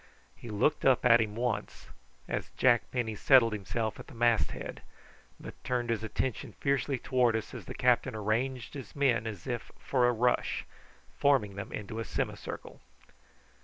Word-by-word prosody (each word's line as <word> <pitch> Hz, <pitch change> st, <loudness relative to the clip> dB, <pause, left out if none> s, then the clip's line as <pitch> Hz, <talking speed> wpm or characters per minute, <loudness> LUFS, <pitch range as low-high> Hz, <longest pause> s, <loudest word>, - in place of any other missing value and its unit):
He 120 Hz, -, -10 dB
looked 105 Hz, +8 st, +1 dB
up 130 Hz, -2 st, +4 dB
at 120 Hz, -1 st, +7 dB
him 105 Hz, -1 st, -2 dB
once, 120 Hz, -2 st, -3 dB, 0.4 s
as -, -, -3 dB
Jack 120 Hz, -3 st, +4 dB
Penny 120 Hz, -3 st, -2 dB
settled 115 Hz, +1 st, +5 dB
himself 110 Hz, +2 st, -3 dB
at -, -, -10 dB
the 145 Hz, -, -13 dB
masthead, 120 Hz, -1 st, 0 dB, 0.6 s
but -, -, -11 dB
turned 120 Hz, -2 st, -1 dB
his 110 Hz, -1 st, -1 dB
attention 115 Hz, +2 st, -3 dB
fiercely 140 Hz, 0 st, 0 dB
towards 125 Hz, -3 st, +2 dB
us 110 Hz, -, -6 dB
as -, -, -8 dB
the -, -, -7 dB
captain -, -, +2 dB
arranged 115 Hz, +4 st, -1 dB
his 135 Hz, -4 st, -9 dB
men 125 Hz, -6 st, +2 dB
as 100 Hz, -6 st, -7 dB
if 120 Hz, -2 st, -4 dB
for 125 Hz, -3 st, +2 dB
a -, -, +4 dB
rush, 120 Hz, +1 st, +1 dB, 0.5 s
forming 135 Hz, -8 st, +3 dB
them 100 Hz, -, -6 dB
into 105 Hz, +2 st, -5 dB
a -, -, -1 dB
semicircle. -, -, -5 dB
120 Hz, 165 wpm, -30 LUFS, 110-130 Hz, 0.6 s, at